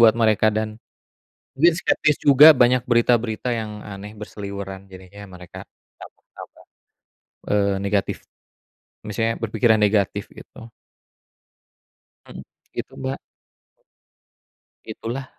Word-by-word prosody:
buat 115 -1 +6
mereka 110 -2 +2
dan, 110 0 -2 0.9
mungkin 165 +5 +4
skeptis 150 -5 +1
juga 145 +2 +8
banyak 125 +1 +4
berita-berita 120 0 +1
yang 110 -2 -4
aneh, 105 +1 -10
berseliweran 100 -2 -8
jadinya 95 +2 -13
mereka 90 -2 -11 0.4
tambah-tambah, - - -14 0.9
eee, 100 -1 +1
negatif, 100 0 -1 0.9
misalnya 115 +2 -2
berpikiran 110 0 +2
negatif 100 -2 0
gitu. 115 - -14 1.6
Hmm, - - -11 0.3
begitu, - - -7
Mbak. 130 +1 -3 1.7
Itulah, 125 +4 -6
110 Hz, 95 wpm, -22 LUFS, 100-120 Hz, 1.7 s, juga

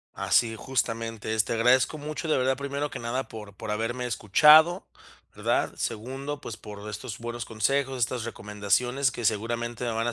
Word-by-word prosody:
Así, 115 -2 +2
justamente 115 -3 -2
es. 110 -2 +3
Te 115 - -2
agradezco 125 +6 +3
mucho, 155 +2 -5
de 155 - +3
verdad, 130 +1 +2
primero 140 +2 -3
que - - -6
nada, 120 +3 -2
por 105 -2 -9
por 105 - -6
haberme 120 +3 -2
escuchado, 155 - +6 0.5
¿verdad? - - 0
Segundo, 135 +6 -4
pues, 110 - -7
por 105 -1 -9
estos 105 +2 -6
buenos 120 0 -5
consejos, 135 +4 0
estas 120 0 0
recomendaciones 115 +5 0
que 120 -3 -6
seguramente 120 +3 -1
me 120 - -1
van 115 +1 -1
a 120 - 0
120 Hz, 170 wpm, -27 LUFS, 110-135 Hz, 0.5 s, escuchado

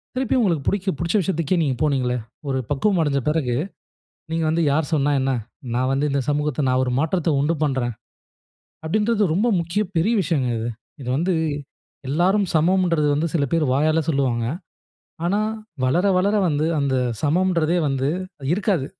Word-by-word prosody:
திருப்பியும் 260 0 +1
உங்களுக்கு 165 -9 0
புடிச் 200 -1 0
புடிச்ச 170 +3 -1
விஷயத்துக்கே 170 -1 0
நீங்க 135 -4 0
போனீங்களே. 130 -5 +1 0.3
ஒரு 135 -1 0
பக்குவம் 180 +7 +1
அடைஞ்ச 140 -2 +1
பிறகு 145 -6 0 0.8
நீங்க 165 0 0
வந்து, 165 +1 +1
"யார் 150 0 0
சொன்னா 145 -1 +2
என்ன? 135 0 +1 0.4
நான் 130 +1 +1
வந்து 140 +2 +1
இந்த 140 - +1
சமூகத்தை 150 0 0
நான் 130 0 +2
ஒரு 125 - -2
மாற்றத்தை 165 +1 0
உண்டு 155 +4 +1
பண்ணுறேன்." 130 -5 -1 0.9
அப்படீன்றது 210 +1 +1
ரொம்ப 210 +7 +2
முக்கிய 170 +5 -1
பெரிய 195 +9 +2
விஷயங்க 145 -8 0
இது. 115 +1 -3 0.3
இது 125 - -7
வந்து 175 +5 +1 0.7
எல்லாரும் 185 +8 +2
சமமுன்றது 170 -2 +2
வந்து 155 +3 0
சில 150 -4 +2
பேர் 165 -2 +2
வாயால 155 +3 +2
சொல்லுவாங்க. 130 -6 +1 0.8
ஆனா, 195 +4 +1 0.4
வளர 170 +10 +2
வளர 200 +3 +2
வந்து 150 0 0
அந்த 140 -1 0 0.3
சமம்ன்றதே 170 +1 +2
வந்து 135 0 0 0.5
இருக்காது. 190 -8 0
155 Hz, 150 wpm, -22 LUFS, 140-180 Hz, 0.9 s, சொன்னா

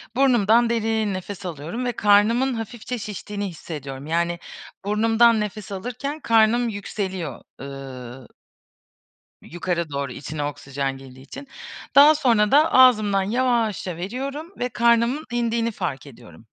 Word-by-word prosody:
burnumdan 240 -3 +4
derin 220 -2 0
nefes 190 +1 -7
alıyorum 175 - -5
ve 245 - 0
karnımın 225 +5 +3
hafifçe 235 +2 -5
şiştiğini 205 -1 -5
hissediyorum. 140 -5 -8
Yani, 170 +1 0 0.5
burnumdan 225 +2 +3
nefes 210 -1 -5
alırken 250 +9 -5
karnım 230 -1 +3
yükseliyor 190 - -5 0.2
ııı 130 -2 -9 1.1
yukarı 170 -1 -3
doğru 140 -2 -3
içine 150 +1 -5
oksijen 140 -1 -4
girdiği 130 -1 -13
için. 280 - -11 0.5
Daha 295 +2 +8
sonra 235 -8 +2
da 305 +3 +5
ağzımdan 215 -6 +5
yavaşça 220 -5 0
veriyorum 270 - -5
ve 250 - -1
karnımın 235 +5 +2
indiğini 235 -1 0
fark 145 -10 -5
ediyorum. 110 - -15
210 Hz, 120 wpm, -23 LUFS, 165-240 Hz, 1.1 s, Daha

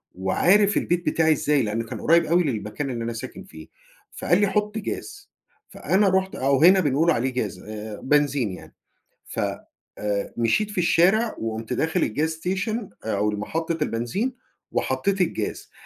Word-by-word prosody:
وعارف 190 - +3
البيت 175 0 0
بتاعي 160 -1 +3
إزاي، 145 -2 +1
لأنّه 110 +2 -2
كان - - -7
قريب 170 +1 +4
أوي 170 +3 +3
للمكان 115 +1 -3
اللي 120 -2 -3
أنا 115 0 -3
ساكن 115 - -7
فيه. 80 -1 -13 0.5
فقال 175 +4 +2
لي: 205 - +4
"حط 210 +2 -1
جاز." 400 - -6 0.4
فأنا 195 +1 +1
رُحت 190 0 0
أو 135 +2 +2
هنا 190 +2 +7
بنقول 155 +1 +2
عليه 130 -2 0
جاز 105 -8 -3
آآ 105 +1 -7
بنزين 140 -6 +2
يعني. 90 - -11 0.5
ف - - -4 0.6
آآ، 100 -1 -2
مشيت 120 - +1
في 205 - -5
الشارع 190 +7 +3
وقُمت 110 0 -4
داخل 160 +3 0
الgas 160 +4 +1
station 195 +5 -1 0.3
أو 105 0 +1
المحطة 160 +11 -3
البنزين 150 - -2 0.4
وحطيت 200 -1 0
الجاز، 180 - -2
150 Hz, 155 wpm, -24 LUFS, 115-190 Hz, 0.6 s, هنا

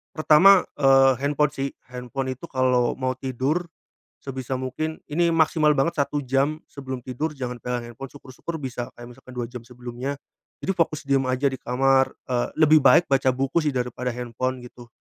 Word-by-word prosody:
Pertama, 175 +5 +6 0.2
eee, 135 -1 +6
handphone 150 +1 +2
sih. 135 +1 -3 0.2
Handphone 130 +1 -4
itu 170 - -9
kalau 130 -5 +1
mau 130 -1 -3
tidur, 135 +7 -1 0.6
sebisa 130 -1 -5
mungkin 155 +5 -4
ini 170 +3 +2
maksimal 155 -1 +3
banget 145 +4 0
1 145 +1 -3
jam 135 +4 +1
sebelum 130 -2 -7
tidur 145 +6 -3
jangan 125 -2 -5
pegang 125 -1 -3
handphone 135 +4 -8
syukur-syukur 140 +4 -8
bisa 125 -2 -4
kayak 120 0 -10
misalkan 130 +1 -15
2 120 - -1
jam 125 -1 -7
sebelumnya, 125 +2 -6 0.5
jadi 190 - 0
fokus 155 -2 0
diam 135 -1 +2
aja 130 +2 +1
di 130 - -5
kamar, 135 +2 +2 0.2
eee, 120 -1 0
lebih 155 0 +7
baik 170 - +6
baca 135 -1 +3
buku 135 +5 0
sih 150 -2 -1
daripada 125 0 -2
handphone 125 +1 -3
gitu. 120 0 -13
135 Hz, 170 wpm, -24 LUFS, 125-145 Hz, 0.6 s, lebih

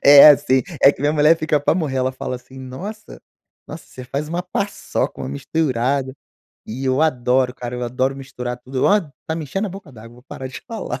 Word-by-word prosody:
É, 145 +1 +10
assim, 130 -3 +5 0.2
é 140 - +9
que - - -14
minha 145 +1 +2
mulher 155 +2 +5
fica 155 -2 +1
pra 145 - +2
morrer, 150 -7 -1
ela 130 0 0
fala 130 -1 -4
assim: 130 +2 -14
“Nossa 130 - -8 0.5
nossa - - -9
você 130 - -11
faz 140 +4 -4
uma 175 +2 -2
paçoca, 200 +2 -3
uma - - -4
misturada”, 130 - -1 0.5
e 130 +5 -5
eu 130 +2 +1
adoro 125 -4 +2
cara, 125 -1 -6
eu 125 - -4
adoro 130 +3 0
misturar 125 -2 -6
tudo. 130 +1 -3
Ó, 205 +1 +5 0.3
tá 160 - -2
me 160 - -4
enchendo 195 +9 -2
a - - -8
boca 185 -5 -10
d'água, 115 +1 -13
vou 125 - -17
parar 130 0 -7
de 130 - -8
falar, 215 - -5
130 Hz, 215 wpm, -20 LUFS, 125-155 Hz, 0.5 s, É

